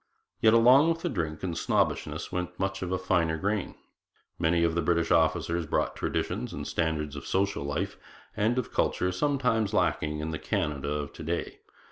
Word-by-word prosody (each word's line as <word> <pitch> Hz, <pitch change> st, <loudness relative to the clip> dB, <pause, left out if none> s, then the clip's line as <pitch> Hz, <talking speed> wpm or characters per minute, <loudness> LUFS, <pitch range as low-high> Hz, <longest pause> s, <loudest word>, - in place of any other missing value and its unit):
Yet 110 Hz, 0 st, +5 dB
along 130 Hz, +7 st, +7 dB
with 165 Hz, 0 st, -1 dB
the 175 Hz, -, 0 dB
drink 80 Hz, -, -3 dB
and 90 Hz, -3 st, -1 dB
the -, -, -5 dB
snobbishness -, -, 0 dB
went 90 Hz, 0 st, -4 dB
much 95 Hz, 0 st, -1 dB
of 95 Hz, 0 st, -1 dB
finer 85 Hz, -4 st, +2 dB
grain. 100 Hz, +3 st, -2 dB, 0.6 s
Many 85 Hz, 0 st, +2 dB
of 85 Hz, -1 st, +2 dB
the 85 Hz, -, +1 dB
British 85 Hz, 0 st, +1 dB
officers 85 Hz, 0 st, +2 dB
brought -, -, 0 dB
traditions -, -, -2 dB
and -, -, -5 dB
standards 75 Hz, -3 st, -1 dB
of 70 Hz, -, -7 dB
social 100 Hz, -5 st, 0 dB
life 70 Hz, 0 st, -3 dB, 0.4 s
and 110 Hz, +4 st, +1 dB
of 125 Hz, -, -2 dB
culture 90 Hz, -, +1 dB
sometimes 115 Hz, -2 st, +1 dB
lacking 75 Hz, -5 st, +1 dB
in 80 Hz, +1 st, -3 dB
the 80 Hz, -, -4 dB
Canada 70 Hz, -1 st, -2 dB
of 75 Hz, -1 st, -3 dB
to -, -, -10 dB
day. 85 Hz, +2 st, -3 dB
85 Hz, 180 wpm, -28 LUFS, 80-105 Hz, 0.6 s, along